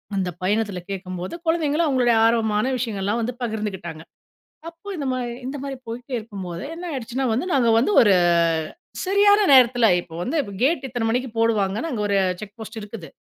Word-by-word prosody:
அந்த 190 -2 0
பயணத்தில 205 0 0
கேட்கும்போது 185 -2 -5
கொழந்தைங்களும், 325 -1 +1
அவங்களுடைய 250 -4 +3
ஆர்வமான 220 -1 +2
விஷயங்கள்லாம் 215 -2 -2
வந்து 240 +2 -2
பகிர்ந்துக்கிட்டாங்க. 205 -8 -4 0.7
அப்போ 335 +4 -19
இந்த 290 - -3
மாதிரி 250 -2 -2
இந்த 270 +3 -4
மாரி 275 -1 -4
போயிட்டே 245 +3 -7
இருக்கும்போது, 190 -5 -7
என்ன 350 +2 -7
ஆயிடுச்சுன்னா 260 -1 -3
வந்து 250 +10 -1
நாங்க 245 -4 +3
வந்து 240 - +2
ஒரு 205 -4 +5 0.9
சரியான 405 +2 +5
நேரத்தில 245 -2 +6 0.2
இப்போ 165 -2 -12
வந்து 270 - -2 0.3
கேட் 295 +1 +2
இத்தனை 245 -3 -3
மணிக்கு 250 +3 -1
போடுவாங்கன்னு 220 +3 +1
அங்கே 220 -5 -2
ஒரு 200 -1 +2 0.2
செக் 210 +1 -10
போஸ்ட் 220 +1 -7
இருக்குது. 205 -5 -9
230 Hz, 160 wpm, -23 LUFS, 205-265 Hz, 0.9 s, நேரத்தில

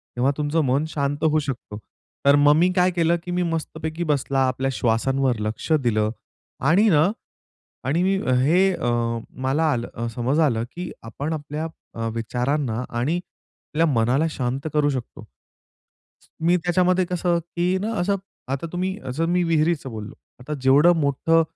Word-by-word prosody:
तेव्हा 130 +3 +2
तुमचं 150 +2 +1
मन 135 +4 +1
शांत 145 0 -2
होऊ 155 0 +3
शकतो. 125 -7 -5 0.5
तर 140 +1 +7
मग 145 0 +6
मी 180 +3 +3
काय 180 0 +3
केलं, 170 -1 +2
की 180 - -6
मी 180 0 0
मस्तपैकी 160 0 -3
बसला 140 -2 0
आपल्या 135 +1 -1
श्वासांवर 125 +1 +1
लक्ष 110 +8 -4
दिलं. 110 -2 +2 0.5
आणि 175 - +4
ना 160 +2 +4 0.8
आणि 165 +6 +2
मी 195 +1 +2 0.3
हे 180 +7 +4
अ, 120 - -2 0.5
मला 150 +4 +2
आलं 120 -1 -3
समज 130 +6 0
आलं, 120 -8 +2
की 175 0 -6
आपण 145 +7 -4
आपल्या 150 +1 -4 0.3
अ, 115 0 -2
विचारांना 125 +1 -1
आणि 125 +8 -1
आपल्या 165 -2 -4
मनाला 130 +3 +2
शांत 135 +1 -3
करू 150 -1 +3
शकतो. 130 -4 -5 1.2
मी 175 +1 +5
त्याच्यामध्ये 180 +1 +2
कसं 175 -1 0
की 175 +2 -1
ना 215 +4 -2
असं, 200 +2 +1 0.3
आता 135 +5 -2
तुम्ही 185 +2 -2
असं 155 +6 -1
मी 180 - +2
विहिरीचं 160 -4 +1
बोललो 110 -1 -7 0.3
आता 150 +4 -5
जेवढं 140 +6 +6
मोठं, 155 +4 +3
150 Hz, 155 wpm, -23 LUFS, 130-170 Hz, 1.2 s, तर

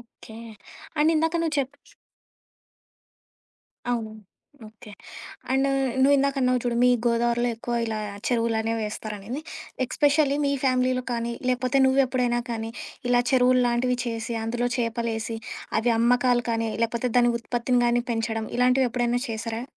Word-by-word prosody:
Okay. 230 -1 -15 0.6
And 310 +2 +4
ఇందాక 325 +2 +1
నువ్వు 320 -2 -1
చెప్ 270 +1 -4 2.2
అవును. 225 -3 -2 0.6
ఓకే. 215 0 -15 0.6
అండ్ 270 +1 +2 0.3
నువ్విందాకన్నావు 270 -2 +3
చూడు 240 -1 0
మీ - - +6 0.2
గోదావరిలో 235 +1 +1
ఎక్కువ 240 +1 -4
ఇలా 220 -1 -3 0.3
చెరువులనేవి 230 -2 0
ఏస్తారనేది. 215 +4 -6 0.4
ఎక్స్పెషల్లీ 290 +2 +2
మీ 280 - +1
ఫ్యామిలీలో 255 -1 +2
కానీ, 235 0 -2 0.2
లేకపోతే 255 +1 +1
నువ్వెప్పుడైనా 255 -2 +2
కానీ 225 -1 -3 0.4
ఇలా 245 0 +4
చెరువుల్లాంటివి 250 -1 +3
చేసి 230 0 -3
అందులో 240 +2 -1
చేపలేసి 230 -1 -2 0.4
అవి 230 +1 +2
అమ్మకాలు 245 +1 +3
కానీ, 230 0 0
లేకపోతే 235 +2 -1
దాని 240 0 +4
ఉత్పత్తిని 240 +1 0
గాని 240 0 +2
పెంచడం 225 -1 -2
ఇలాంటివెప్పుడైనా 245 -1 +2
చేశారా? 225 +1 -4
240 Hz, 115 wpm, -25 LUFS, 230-255 Hz, 2.2 s, మీ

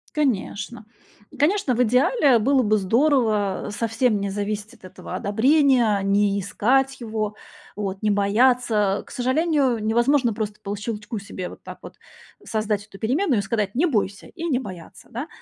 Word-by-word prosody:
Конечно. 235 -5 -2 0.5
Конечно, 300 -2 +2
в 250 - +3
идеале 255 - +3
было 265 +3 +3
бы 215 -1 +2
здорово 220 -2 +1
совсем 225 0 0
не 200 - -2
зависеть 205 +2 -4
от 215 - -17
этого 185 -1 -10
одобрения, 240 0 +3
не 200 0 +2
искать 265 +8 +1
его, 215 -2 -3 0.4
вот 195 -2 -4
не 215 -1 +1
бояться. 210 0 +2
К - - -16
сожалению, 265 -1 +1
невозможно 240 +3 +2
просто 210 0 -5
по 200 - -3
щелчку 210 +1 -5
себе 185 -2 -7
вот - - -14
так - - -10
вот - - -11 0.5
создать 215 -2 -2
эту 205 -2 -14
переменную 255 - +1
и - - +1
сказать: 205 -1 -2
"Не 325 +8 +3
бойся", 205 -6 -2
и 335 -1 -7
не 280 -7 +1
бояться, 185 -9 -10
да. 245 +7 -5
220 Hz, 155 wpm, -23 LUFS, 205-260 Hz, 0.5 s, в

